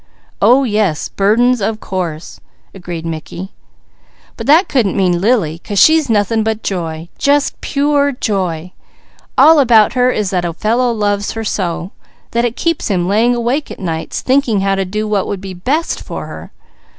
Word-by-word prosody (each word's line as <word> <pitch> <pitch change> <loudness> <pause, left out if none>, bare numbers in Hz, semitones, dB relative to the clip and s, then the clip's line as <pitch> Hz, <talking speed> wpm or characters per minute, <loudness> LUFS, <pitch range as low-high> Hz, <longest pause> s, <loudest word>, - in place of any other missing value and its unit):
"Oh 265 +3 +5
yes! 210 - 0
'Burdens,' 230 +4 +2
of 215 +2 -1
course!" 175 -6 -5 0.3
agreed 175 -3 -7
Mickey. 165 +3 -6 0.8
"But - - -7
that 320 +7 +5
couldn't 230 -8 0
mean 180 -3 +1
Lily, 195 -8 +1
'cause 205 +3 -6
she's 315 +4 +5
nothing 220 +1 +1
but 220 0 -2
joy! 165 -3 -4
Just 285 0 +1
pure 285 0 +1
joy! 185 - -2 0.7
All 320 -1 +7
about 230 -5 +5
her 250 0 +3
is 210 -6 -1
that 180 -2 0
a 170 -1 -2
fellow 235 +7 +1
loves 205 -2 -1
her 225 - -4
so, 180 -3 -3 0.4
that 235 +1 +1
it 240 -1 -2
keeps 335 -2 -1
him 180 -4 0
laying 225 +5 +2
awake 245 +5 -1
at - - -8
nights 165 -4 -4
thinking 255 -6 +1
how 195 0 +1
to 195 0 -1
do 210 +3 -3
what 205 -2 0
would 200 - -3
be 190 0 -7
best 270 - -2
for - - -6
her. - - -10
210 Hz, 170 wpm, -15 LUFS, 185-245 Hz, 0.8 s, All